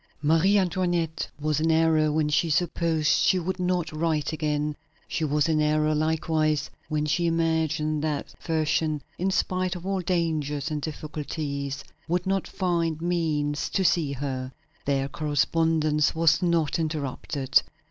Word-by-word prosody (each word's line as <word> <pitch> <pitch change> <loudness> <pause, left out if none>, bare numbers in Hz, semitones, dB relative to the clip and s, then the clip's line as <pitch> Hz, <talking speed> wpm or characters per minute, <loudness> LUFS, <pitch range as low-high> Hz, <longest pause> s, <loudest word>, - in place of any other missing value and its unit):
Marie 165 +7 +4
Antoinette 175 -3 0
was 150 0 0
in 160 +1 +1
error 160 -1 +3
when 155 0 +1
she 160 +3 +1
supposed 165 -1 0
she 185 - +4
would 185 +2 -2
not 180 -2 0
write 155 -1 -1
again. 150 -1 -1 0.3
She 160 - -2
was 150 0 +2
in 155 -1 +2
error, 155 0 +2
likewise, 155 -1 0 0.2
when 150 -1 0
she 165 +3 +1
imagined 160 -2 0
that 150 -2 -2
Fersen, 155 -2 0 0.2
in 185 +2 +1
spite 185 -1 0
of 180 0 -8
all 195 -1 -1
dangers 155 -5 -1
and 150 -1 -2
difficulties, 145 -2 -4 0.2
would 175 +2 0
not 195 0 0
find 170 -4 -1
means 155 -4 -1
to 190 - 0
see 155 -5 +2
her 130 -1 -3
again. 130 - -10 0.3
Their 135 -1 +1
correspondence 155 +1 +1
was 165 +1 +3
not 170 -2 +1
interrupted. 140 -3 0
155 Hz, 145 wpm, -26 LUFS, 150-170 Hz, 0.3 s, Marie